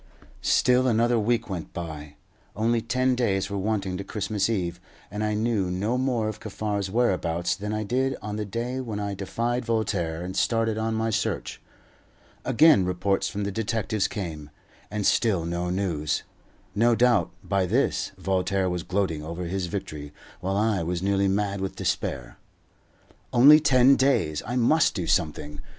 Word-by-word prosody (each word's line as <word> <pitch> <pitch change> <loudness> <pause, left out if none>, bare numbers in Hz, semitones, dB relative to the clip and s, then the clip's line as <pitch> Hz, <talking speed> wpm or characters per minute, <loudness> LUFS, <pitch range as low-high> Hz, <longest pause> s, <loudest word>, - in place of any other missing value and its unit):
Still 125 +1 +3
another 120 0 +3
week 115 +1 0
went 90 -5 -6
by. 75 -4 -7 0.4
Only 115 +3 +1
ten 130 +3 +1
days 100 -6 0
were 100 - -2
wanting 95 -2 -1
to 100 - -5
Christmas 105 0 -1
Eve, 90 -5 -2 0.3
and 105 +2 -3
I 105 0 0
knew 105 -4 0
no 100 +7 -1
more 125 -4 0
of 110 -1 -5
Kaffar's 105 -2 -3
whereabouts 90 -6 0
than 105 +2 -5
I 110 0 -1
did 130 +5 0
on 105 0 -5
the 105 - -2
day 120 +5 -3
when 115 -5 -4
I 100 -1 -3
defied 115 +6 -2
Voltaire 95 -8 -1
and 95 +1 -6
started 115 -1 +1
on 110 0 -1
my 110 0 0
search. 110 - -2 0.8
Again 150 - +5
reports 90 +2 0
from 105 - -4
the 100 - -2
detectives 110 -1 -1
came, 80 -7 -6 0.4
and 105 -1 -3
still 95 -8 +2
no 85 +1 -2
news. 90 -6 -1 0.5
No 115 +2 +3
doubt, 120 -7 +3
by 95 -2 0
this, 105 -2 0
Voltaire 95 0 0
was 90 -1 -2
gloating 90 -4 -1
over 85 +4 -5
his 90 +1 -2
victory, 75 -7 -6 0.3
while 95 +2 -2
I 105 -3 +1
was 85 +2 -2
nearly 100 0 +2
mad 100 0 0
with 95 - -3
despair. 60 -3 -3 0.9
Only 145 +5 +8
ten 135 -2 +5
days! 130 - +2
I 120 - -2
must 135 +6 +3
do 90 - -2
something. 75 -3 -1
100 Hz, 165 wpm, -26 LUFS, 90-115 Hz, 0.9 s, Only